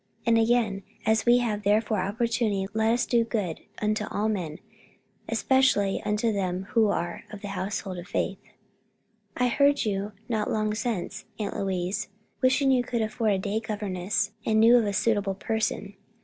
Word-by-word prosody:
And 230 -1 +4
again, 225 -4 +2 0.2
'As 220 +1 +2
we 240 +1 +7
have 210 -2 -1
therefore 210 +1 +2
opportunity, 210 0 0
let 220 +1 +2
us 240 +1 +2
do 235 -1 +3
good 210 -8 -2 0.2
unto 215 0 +1
all 215 +2 -1
men, 170 -7 -3 0.7
especially 260 -7 +2
unto 210 +2 0
them 185 -2 -1
who 225 -3 +4
are 175 -4 -2
of 210 -1 -9
the 205 - -4
household 190 -1 -3
of 175 - -9
faith.' - - -2 1.0
"I 250 - +3
heard 280 +2 +3
you, 200 0 -2
not 220 -3 -1
long 215 -1 0
since, 215 -5 -3
Aunt 210 -2 -3
Louise, 190 +2 -2 0.3
wishing 265 +1 +4
you 255 -1 +4
could 235 -2 -1
afford 220 0 0
a - - +1
day 200 +3 -1
governess 205 -1 -2
and 220 0 +2
knew 230 +2 +7
of 230 -3 +4
a 200 - -1
suitable 205 -2 +1
person. 215 -1 -2
215 Hz, 165 wpm, -27 LUFS, 195-230 Hz, 1.0 s, we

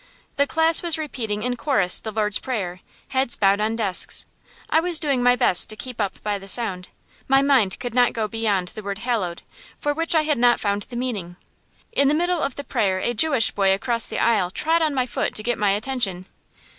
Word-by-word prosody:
The 280 0 +1
class 320 +1 +2
was 340 -2 +2
repeating 225 -9 -4
in 250 0 -1
chorus 200 - +3
the 220 - -6
Lord's 210 -1 0
Prayer, 195 -9 -4 0.3
heads 260 -2 +1
bowed 195 0 +2
on 220 +1 -1
desks. 205 -5 0 0.4
I 320 - +2
was 345 0 +2
doing 280 -5 0
my 245 0 +4
best 185 -6 +2
to 215 - -1
keep 230 +2 -5
up 195 -2 -4
by 205 -1 -2
the 195 - -13
sound; 195 -4 -2 0.4
my 270 +1 +4
mind 260 -9 +2
could 245 -2 -5
not 245 0 +3
go 220 -2 -3
beyond 205 -5 -1
the 215 - -8
word 200 -1 -5
"hallowed," 220 -7 -3 0.4
for 290 - -1
which 330 +2 +2
I 315 - +4
had 300 -4 0
not 240 0 +3
found 200 0 -2
the 245 - -9
meaning. 215 -9 -4 0.6
In 280 -11 +2
the 295 - +2
middle 350 +1 0
of 275 - -2
the 285 - -6
prayer 205 -9 -1
a 240 +5 -2
Jewish 270 -1 +4
boy 195 -1 +2
across 230 +3 +2
the - - -4
aisle 215 -6 +1
trod 325 - 0
on 310 -3 0
my 255 -1 +1
foot - - -3
to 215 - -3
get 240 +1 -1
my 205 -1 +2
attention. 200 -4 0
235 Hz, 220 wpm, -22 LUFS, 200-275 Hz, 0.6 s, my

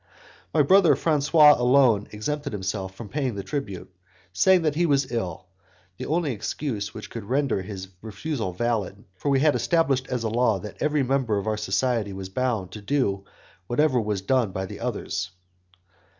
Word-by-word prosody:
My 155 - +4
brother 170 -1 +5
Francois 150 0 +5
alone 125 -4 +4
exempted 140 +6 -4
himself 95 -1 -4
from 115 +2 -8
paying 130 -1 -2
the 100 - -4
tribute, 100 -5 -5 0.4
saying 185 - +4
that 155 -2 +1
he 170 +3 +1
was 140 -4 +1
ill, 95 -7 -3 0.5
the - - -5
only 160 -2 0
excuse 110 0 -3
which 110 - -9
could 115 -3 -6
render 130 -3 0
his 95 -1 -7
refusal 110 0 -4
valid, 105 0 -2
for 140 - -3
we 135 -1 +3
had 150 -1 +4
established 140 -6 +1
as 125 -2 -2
a - - 0
law 115 -2 +2
that 100 +2 -9
every 150 -2 +2
member 130 -5 +1
of 100 - -3
our 110 0 0
society 105 -1 -1
was 95 -1 -7
bound 115 -4 -1
to 105 - -8
do 100 -5 0 0.4
whatever 130 0 +2
was 105 -3 -2
done 120 -1 +1
by 95 0 -3
the 100 +2 -9
others. 100 -6 -3
120 Hz, 175 wpm, -25 LUFS, 100-140 Hz, 0.5 s, brother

